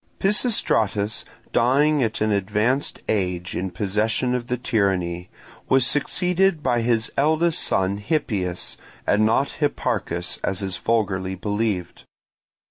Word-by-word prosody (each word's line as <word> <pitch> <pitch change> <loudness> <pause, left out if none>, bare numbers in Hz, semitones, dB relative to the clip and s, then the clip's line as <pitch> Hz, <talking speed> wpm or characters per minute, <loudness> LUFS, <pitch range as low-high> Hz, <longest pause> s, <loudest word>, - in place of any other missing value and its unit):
Pisistratus 110 - +2 0.3
dying 140 +5 +3
at 110 -3 -1
an 110 0 +2
advanced 105 +7 0
age 90 -3 -1
in 95 +1 -2
possession 105 +6 0
of 120 -1 -2
the 125 - -1
tyranny, 90 -7 -1 0.4
was 130 -1 +5
succeeded 180 +4 +1
by 120 -1 +1
his 115 -1 +1
eldest 160 +4 +2
son, 95 +1 +1
Hippias, 100 - -2 0.3
and 110 +1 +3
not 135 +7 0
Hipparchus, 90 - -1
as 95 0 -1
is 95 -1 -2
vulgarly 95 -5 -1
believed. 100 -2 -3
110 Hz, 120 wpm, -23 LUFS, 95-135 Hz, 0.4 s, was